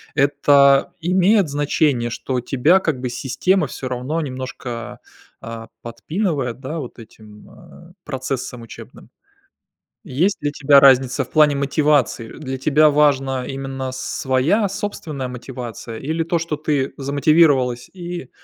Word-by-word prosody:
это 140 Hz, +2 st, +4 dB
имеет 185 Hz, +2 st, +3 dB
значение, 145 Hz, -4 st, 0 dB
что 125 Hz, +1 st, -3 dB
тебя 145 Hz, +9 st, +3 dB
как 150 Hz, -8 st, -2 dB
бы 125 Hz, -, -2 dB
система 150 Hz, +7 st, 0 dB
всё 130 Hz, -, -6 dB
равно 130 Hz, +6 st, -3 dB
немножко, 130 Hz, -3 st, -6 dB, 0.4 s
а, 115 Hz, 0 st, -8 dB, 0.2 s
подпинывает, 135 Hz, -, -3 dB
да, 145 Hz, +5 st, -5 dB
вот 125 Hz, -3 st, -8 dB
этим, 105 Hz, -1 st, -15 dB
а, 170 Hz, +1 st, -16 dB
процессом 130 Hz, -3 st, -4 dB
учебным? 115 Hz, -, -13 dB, 1.0 s
Есть 175 Hz, +10 st, +1 dB
для 145 Hz, 0 st, -2 dB
тебя 145 Hz, -1 st, +5 dB
разница 130 Hz, -2 st, +4 dB
в -, -, -20 dB
плане 150 Hz, -2 st, +4 dB
мотивации? 140 Hz, -4 st, +1 dB
Для 135 Hz, -3 st, -6 dB
тебя 150 Hz, +3 st, +4 dB
важна 135 Hz, -3 st, +2 dB
именно 135 Hz, -1 st, -5 dB
своя 135 Hz, -, 0 dB
собственная 175 Hz, -9 st, -5 dB
мотивация 120 Hz, -2 st, -8 dB
или 160 Hz, +4 st, -2 dB
то, 170 Hz, +1 st, 0 dB
что 165 Hz, -2 st, -3 dB
ты 145 Hz, -3 st, -1 dB
замотивировалась 140 Hz, -3 st, +2 dB
и 175 Hz, -6 st, -7 dB
140 Hz, 125 wpm, -20 LUFS, 130-155 Hz, 1.0 s, тебя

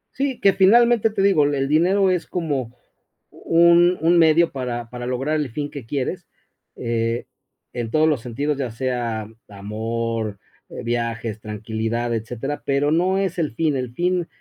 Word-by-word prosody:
Sí, 270 Hz, -1 st, -2 dB
que 195 Hz, -, +4 dB
finalmente 225 Hz, +4 st, +5 dB
te 200 Hz, -2 st, -1 dB
digo, 190 Hz, -7 st, +4 dB
el 140 Hz, -1 st, 0 dB
dinero 185 Hz, +6 st, +3 dB
es 180 Hz, -2 st, -1 dB
como 145 Hz, -9 st, -2 dB, 0.6 s
un 170 Hz, +1 st, +4 dB
un 170 Hz, +2 st, +4 dB
medio 165 Hz, +1 st, +4 dB
para 120 Hz, -3 st, -4 dB
para 120 Hz, 0 st, -6 dB
lograr 135 Hz, +5 st, -1 dB
el 150 Hz, -3 st, -2 dB
fin 145 Hz, +4 st, -4 dB
que 140 Hz, -5 st, -8 dB
quieres, 135 Hz, +1 st, -3 dB, 0.5 s
eh, 115 Hz, 0 st, -2 dB, 0.5 s
en 120 Hz, -2 st, -4 dB
todos 155 Hz, +3 st, +3 dB
los 150 Hz, -7 st, +1 dB
sentidos 140 Hz, +5 st, -2 dB
ya 130 Hz, -3 st, -2 dB
sea 115 Hz, -2 st, -3 dB, 0.2 s
amor, 110 Hz, +1 st, -3 dB, 0.3 s
eh, -, -, -8 dB
viajes, 115 Hz, -2 st, -2 dB
tranquilidad, 110 Hz, +2 st, -3 dB
etcétera, 120 Hz, +5 st, -4 dB
pero 140 Hz, +1 st, +1 dB
no 180 Hz, +4 st, +2 dB
es 195 Hz, -2 st, -1 dB
el 155 Hz, -8 st, -2 dB
fin, 155 Hz, -1 st, +1 dB
el 125 Hz, -2 st, -4 dB
fin, 175 Hz, +1 st, 0 dB
135 Hz, 160 wpm, -22 LUFS, 115-170 Hz, 0.6 s, finalmente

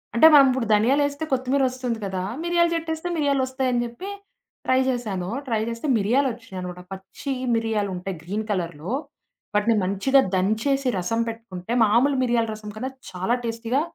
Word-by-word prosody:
అంటే, 275 Hz, +7 st, +8 dB
మనం 285 Hz, -2 st, +9 dB
ఇప్పుడు 255 Hz, -3 st, -1 dB
ధనియాలేస్తే 285 Hz, +7 st, +2 dB
కొత్తిమీరొస్తుంది 255 Hz, -2 st, 0 dB
కదా! 190 Hz, -1 st, -3 dB, 0.2 s
మిరియల 345 Hz, 0 st, +3 dB
చెట్టేస్తే 320 Hz, 0 st, -3 dB
మిరియాలోస్తాయని 260 Hz, -4 st, +1 dB
చెప్పి. 240 Hz, +12 st, -7 dB, 0.6 s
ట్రై 260 Hz, 0 st, +4 dB
చేశాను. 210 Hz, -8 st, -2 dB, 0.2 s
ట్రై 225 Hz, -3 st, +1 dB
చేస్తే 230 Hz, +5 st, -4 dB
మిరియాలు 240 Hz, +7 st, +2 dB
వచ్చేినాయినమాట. 185 Hz, -6 st, -7 dB
పచ్చి 195 Hz, +8 st, -6 dB, 0.2 s
మిరియాలు 220 Hz, -3 st, 0 dB
ఉంటాయి 180 Hz, +1 st, -5 dB
గ్రీన్ 205 Hz, +5 st, -3 dB
కలర్‌లో 170 Hz, -2 st, -3 dB, 0.6 s
వాటిని 215 Hz, +2 st, +3 dB
మంచిగా 200 Hz, +9 st, +3 dB, 0.2 s
దంచేసి 220 Hz, +8 st, +1 dB
రసం 185 Hz, +6 st, -1 dB
పెట్టుకుంటే 225 Hz, -3 st, -6 dB
మామూలు 240 Hz, +6 st, +3 dB
మిరియాల 235 Hz, -2 st, +2 dB
రసం 210 Hz, 0 st, -8 dB
కన్నా 255 Hz, +4 st, -3 dB, 0.2 s
చాలా 190 Hz, +6 st, 0 dB
టేస్టీగా, 230 Hz, +3 st, -1 dB
230 Hz, 140 wpm, -24 LUFS, 200-265 Hz, 0.6 s, మనం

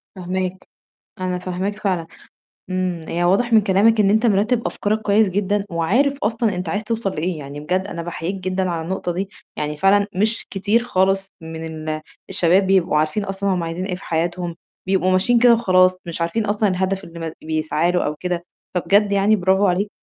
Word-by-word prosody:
فاهماك، 185 Hz, 0 st, -4 dB, 0.5 s
أنا 180 Hz, -1 st, -2 dB
فاهماك 190 Hz, +3 st, -3 dB
فعلًا. 180 Hz, -5 st, -1 dB, 0.6 s
إمم، 185 Hz, -2 st, -1 dB
هي 175 Hz, +1 st, -1 dB
واضح 230 Hz, +7 st, +2 dB
من 220 Hz, -, +7 dB
كلامك 210 Hz, +3 st, +3 dB
إن 200 Hz, -1 st, +4 dB
أنت 220 Hz, +3 st, +3 dB
مرتّب 220 Hz, +3 st, +2 dB
أفكارك 215 Hz, +1 st, -1 dB
كويّس 210 Hz, 0 st, +3 dB
جدًا، 200 Hz, +1 st, 0 dB
وعارف 250 Hz, -, +1 dB
أصلًا 225 Hz, -1 st, 0 dB
أنت 180 Hz, -1 st, -4 dB
عايز 205 Hz, +5 st, -1 dB
توصل 225 Hz, -3 st, -1 dB
لإيه. 165 Hz, +1 st, -2 dB
يعني 145 Hz, +1 st, -8 dB
بجد 185 Hz, +5 st, -1 dB
أنا 170 Hz, -4 st, -5 dB
باحييك 175 Hz, +2 st, -4 dB
جدًا 185 Hz, -1 st, -2 dB
على 165 Hz, -1 st, -2 dB
النقطة 180 Hz, 0 st, -3 dB
دي. 190 Hz, +3 st, -3 dB, 0.3 s
يعني 150 Hz, 0 st, -3 dB
فعلًا 200 Hz, +4 st, +4 dB
مش 215 Hz, +4 st, 0 dB
كتير 210 Hz, +4 st, +1 dB
خالص 195 Hz, -2 st, +1 dB
من 160 Hz, 0 st, -7 dB, 0.2 s
ال 155 Hz, 0 st, -2 dB, 0.3 s
الشباب 185 Hz, +3 st, +3 dB
بيبقوا 185 Hz, -5 st, +3 dB
عارفين 155 Hz, +7 st, +1 dB
أصلًا 195 Hz, 0 st, -2 dB
هُم 175 Hz, -, -1 dB
عايزين 165 Hz, +3 st, -3 dB
إيه 185 Hz, -, -2 dB
في 180 Hz, -, -10 dB
حياتهم، 170 Hz, +1 st, -2 dB, 0.3 s
بيبقوا 185 Hz, -1 st, +2 dB
ماشيين 235 Hz, +6 st, +3 dB
كده 240 Hz, 0 st, +6 dB
وخلاص، 185 Hz, -5 st, +4 dB
مش 170 Hz, 0 st, -5 dB
عارفين 210 Hz, +6 st, 0 dB
أصلًا 205 Hz, 0 st, +1 dB
الهدف 190 Hz, +1 st, -1 dB
اللي 170 Hz, 0 st, -11 dB
م -, -, -7 dB
بيسعى 155 Hz, +2 st, 0 dB
له 180 Hz, -, +1 dB
أو 150 Hz, -, -2 dB
كده. 175 Hz, -1 st, -2 dB, 0.3 s
فبجد 200 Hz, +3 st, +3 dB
يعني 200 Hz, +2 st, +4 dB
براڨو 185 Hz, -1 st, -6 dB, 0.2 s
عليك. 195 Hz, +4 st, +1 dB
185 Hz, 190 wpm, -21 LUFS, 175-205 Hz, 0.6 s, من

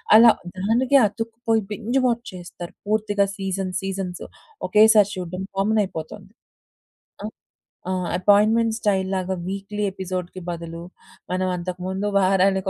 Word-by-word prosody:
అలా 230 Hz, +1 st, +9 dB, 0.3 s
దానికే 245 Hz, +8 st, +3 dB
అతుక్కుపోయి 225 Hz, +1 st, -2 dB
binge 235 Hz, +6 st, -1 dB
watch 235 Hz, -1 st, -1 dB
చేస్తారు 175 Hz, -1 st, -9 dB
పూర్తిగా 205 Hz, -1 st, +1 dB
సీజన్ 195 Hz, -1 st, -3 dB
సీజన్స్. 190 Hz, -2 st, -4 dB, 0.5 s
ఒకేసారి 210 Hz, -1 st, +6 dB
చూడ్డం 180 Hz, +1 st, -5 dB
కామన్ 215 Hz, +2 st, +2 dB
అయిపోతొంది. 195 Hz, +4 st, -8 dB, 0.9 s
ఆ? -, -, -3 dB, 0.6 s
ఆ! -, -, 0 dB, 0.3 s
అపాయింట్మెంట్ 215 Hz, +4 st, +4 dB
స్టైల్‌లాగా 190 Hz, -3 st, 0 dB
వీక్‌లీ 200 Hz, +2 st, -4 dB
ఎపిసోడ్‌కీ 185 Hz, -1 st, -5 dB
బదులు 170 Hz, -1 st, -6 dB, 0.5 s
మనం 185 Hz, +1 st, 0 dB
అంతకు 180 Hz, +1 st, -5 dB
ముందు 190 Hz, +2 st, -2 dB
వారానికి 190 Hz, 0 st, +2 dB
195 Hz, 115 wpm, -23 LUFS, 185-215 Hz, 0.9 s, అలా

